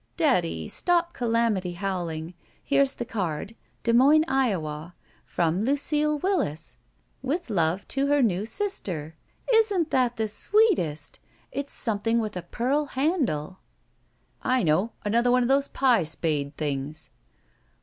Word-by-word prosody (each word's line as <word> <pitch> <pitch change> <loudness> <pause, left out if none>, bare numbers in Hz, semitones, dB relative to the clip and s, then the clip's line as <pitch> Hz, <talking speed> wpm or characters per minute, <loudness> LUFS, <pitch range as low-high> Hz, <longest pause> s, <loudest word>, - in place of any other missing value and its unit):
"Daddy, 80 -1 +1
stop 345 -1 +1
calamity 230 -7 0
howling. 175 -3 -4 0.3
Here's 275 -1 +2
the 240 - -5
card. 200 -3 -3 0.3
Des 230 - +2
Moines, 285 +6 +6
Iowa. 175 - -1 0.3
'From 170 +2 0
Lucile 295 +4 +1
Willis, 290 - -2 0.4
with 280 +1 -3
love 175 0 0
to 275 0 +1
her 290 -1 +3
new 195 -4 +1
sister.' 185 - -2 0.4
Isn't 410 -8 +3
that 250 -2 +2
the 220 -1 -1
sweetest! 210 - +1 0.3
It's 280 0 -4
something 225 +1 0
with 215 -4 -2
a 180 - -3
pearl 255 - -1
handle." 260 - -1 0.3
' - - -42
* - - -42
I 255 -2 +1
know. 180 +8 +1
Another 235 +4 +2
one 250 0 +4
of 240 - -1
those 275 +1 +3
pie 245 -8 +3
spade 150 -3 -2
things. 145 +1 -3
230 Hz, 135 wpm, -26 LUFS, 170-275 Hz, 0.4 s, Moines